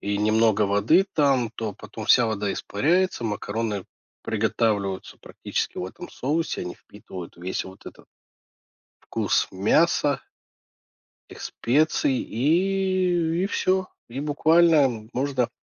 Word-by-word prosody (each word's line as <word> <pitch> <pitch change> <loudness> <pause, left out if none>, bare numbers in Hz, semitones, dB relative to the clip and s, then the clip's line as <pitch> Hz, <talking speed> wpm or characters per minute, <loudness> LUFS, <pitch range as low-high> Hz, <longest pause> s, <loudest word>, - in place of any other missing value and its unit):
И 100 0 -2
немного 110 0 +3
воды 105 - +3
там, 135 -6 +2
то 110 -4 -4
потом 110 +1 -9
вся 120 -1 +6
вода 105 -2 -1
испаряется, 170 - 0
макароны 105 -2 -3 0.4
приготавливаются 105 -3 -1
практически - - -4
в - - -3
этом 175 - -9
соусе, 155 +5 -2
они 90 0 -6
впитывают 95 -4 -11
весь 90 +2 -3
вот 95 0 -13
этот - - -12 1.1
Вкус - - +1
мяса. 140 - +2 1.1
Этих - - -11
специй. 135 0 +1
И 180 - +1
и - - +2
всё. 190 -2 0 0.2
И 125 - -5
буквально 150 -6 +3
можно, 130 -2 0
120 Hz, 115 wpm, -24 LUFS, 105-160 Hz, 1.1 s, вся